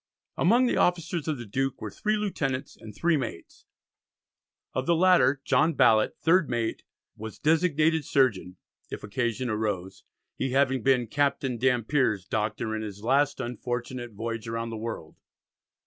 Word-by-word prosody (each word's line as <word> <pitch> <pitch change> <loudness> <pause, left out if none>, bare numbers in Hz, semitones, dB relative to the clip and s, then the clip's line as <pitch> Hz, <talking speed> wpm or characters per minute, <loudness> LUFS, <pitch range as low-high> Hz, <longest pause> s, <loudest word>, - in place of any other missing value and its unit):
Among 235 +9 +4
the - - +1
officers 170 -2 0
of 155 -3 -1
the 120 - -7
Duke 135 +5 -2
were - - -6
three 215 0 -1
lieutenants 145 -10 -3
and 110 -2 -12
three 170 +6 +2
mates. 115 -10 -7 1.1
Of 130 0 -2
the 170 - +4
latter, 160 -7 +4
John 160 +2 +2
Ballet, 110 -5 +4
third 170 0 +4
mate, 115 -2 -2 0.3
was 110 -1 -8
designated 160 0 +2
surgeon 110 -10 +1 0.3
if - - -7
occasion 120 +3 -2
arose, 105 -4 -3 0.3
he 130 -1 -2
having 135 -2 +2
been 125 -1 +3
"Captain 135 -1 -1
Dampier's 125 - +1
Doctor 110 +2 -2
in 110 - -3
his 105 -1 -7
last 140 +4 +2
unfortunate 120 0 -4
voyage 115 +1 -5
round 115 0 -3
the - - -4
world." 110 -8 -6
130 Hz, 150 wpm, -27 LUFS, 110-145 Hz, 1.1 s, Among